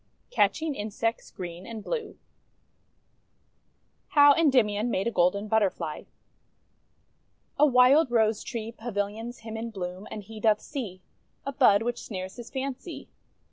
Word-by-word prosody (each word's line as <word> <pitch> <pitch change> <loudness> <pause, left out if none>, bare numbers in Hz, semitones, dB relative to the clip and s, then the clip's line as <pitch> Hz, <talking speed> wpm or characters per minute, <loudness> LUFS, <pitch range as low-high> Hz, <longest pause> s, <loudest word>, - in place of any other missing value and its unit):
CATCHING 320 -10 +1
INSECTS 225 0 -3
GREEN 175 -1 -8
AND 225 -2 -7
BLUE 455 -4 -4 1.9
HOW 290 -1 +7
ENDYMION 245 -8 +2
MADE 195 -4 0
A 235 - 0
GOLDEN 200 +2 +2
BUTTERFLY 210 -3 0 1.5
A 300 - +7
Wild 260 +3 +5
Rose 220 -2 +2
tree 230 -2 -5
Pavilions 225 +1 -4
him 220 0 -7
in 225 +1 -4
bloom, 185 -2 -6
and 210 - -7
he 215 +2 -10
doth 215 -1 +3
see 205 -11 -6 0.4
A 275 - -2
bud 205 -5 +4
which 240 0 -2
snares 185 -3 -6
his 240 -1 -9
fancy. 270 +5 -5
225 Hz, 130 wpm, -27 LUFS, 205-255 Hz, 1.9 s, HOW